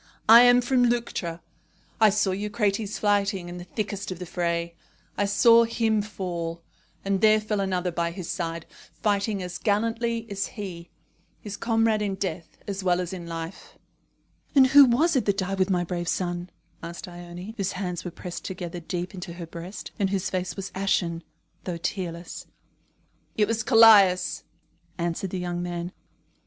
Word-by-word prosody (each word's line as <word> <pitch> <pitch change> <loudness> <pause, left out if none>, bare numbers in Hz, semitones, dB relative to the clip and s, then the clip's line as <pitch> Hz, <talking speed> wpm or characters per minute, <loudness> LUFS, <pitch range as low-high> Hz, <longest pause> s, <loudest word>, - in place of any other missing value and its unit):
"I 230 +2 +10
am 245 0 +6
from 245 0 +2
Leuctra. 190 -8 -2 0.6
I 220 -1 +7
saw 205 -1 +1
Eucrates 210 +1 -1
fighting 200 -3 +1
in 175 0 -7
the 175 - -8
thickest 205 0 -4
of 185 - -5
the 180 - -6
fray. 170 -1 -2 0.4
I 205 - +1
saw 230 +3 +6
him 225 -2 +1
fall; 170 -5 -5 0.4
and 195 -1 0
there 215 0 +6
fell 215 -1 -2
another 185 -2 -1
by 170 0 -1
his 170 0 -7
side, 165 -2 -3 0.3
fighting 205 -2 0
as 180 0 -6
gallantly 230 +2 0
as 200 0 -2
he 175 -5 -7 0.5
his 210 -1 -7
comrade 225 -1 +1
in 200 -2 -1
death 175 -4 -5
as 200 -1 -4
well 180 -1 +2
as 180 0 -3
in 175 -2 -7
life." 165 +2 -7 0.8
"And 270 -2 +8
who 280 +2 +8
was 290 +7 +2
it 260 - +2
that 200 -1 +1
died 195 0 -2
with 185 +1 +2
my 180 -2 +1
brave 175 0 -4
son?" 175 0 -2 0.3
asked 170 +2 -7
Ione, 175 +3 -9
whose 195 -2 -1
hands 180 -3 -4
were 180 - -4
pressed 175 +1 -8
together 175 -2 -5
deep 175 +3 -4
into 180 -2 -7
her 170 0 -7
breast, 170 +4 -8
and 195 -2 +2
whose 195 -2 -1
face 185 -1 -2
was 195 -1 -6
ashen, 175 -3 0 0.4
though 175 -2 -3
tearless. 170 -1 -5 0.9
"It 210 -1 +3
was 225 0 0
Callias," 210 -6 +6 0.5
answered 170 +2 -2
the 185 - -4
young 175 -1 -3
man. 175 0 -4
190 Hz, 170 wpm, -26 LUFS, 175-210 Hz, 0.9 s, I